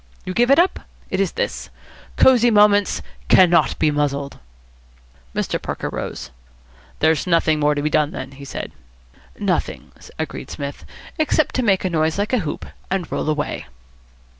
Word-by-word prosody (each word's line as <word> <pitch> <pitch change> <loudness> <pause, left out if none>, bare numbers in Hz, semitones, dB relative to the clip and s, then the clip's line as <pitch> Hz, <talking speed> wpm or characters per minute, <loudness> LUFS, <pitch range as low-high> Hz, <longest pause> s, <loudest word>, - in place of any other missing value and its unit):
You 185 - -4
give 240 +5 +2
it 275 - +6
up? 350 +3 +3 0.3
It 190 - -1
is 195 -3 0
this: - - -3 0.5
'Cosy 245 -2 +6
Moments 205 -2 +4 0.2
cannot 175 -2 +5
be 155 -1 +2
muzzled!'" 140 -1 -2 1.0
Mr. - - -1
Parker - - -4
rose. - - -6 0.7
"There's 160 +2 +2
nothing 165 -3 +2
more 150 0 +2
to 145 - -2
be 150 - +1
done 150 -1 +2
then," 135 -6 -7
he 140 +1 -12
said. 140 - -6 0.7
"Nothing," - - -2 0.3
agreed - - -5
Psmith, 140 0 -6 0.3
"except 310 -1 +2
to 255 - 0
make 195 -5 +2
a - - +1
noise 160 0 +1
like 205 +4 -1
a 250 - +4
hoop 155 -7 -4 0.2
and 190 -3 -2
roll - - -1
away." 150 -1 -2
170 Hz, 160 wpm, -21 LUFS, 150-205 Hz, 1.0 s, it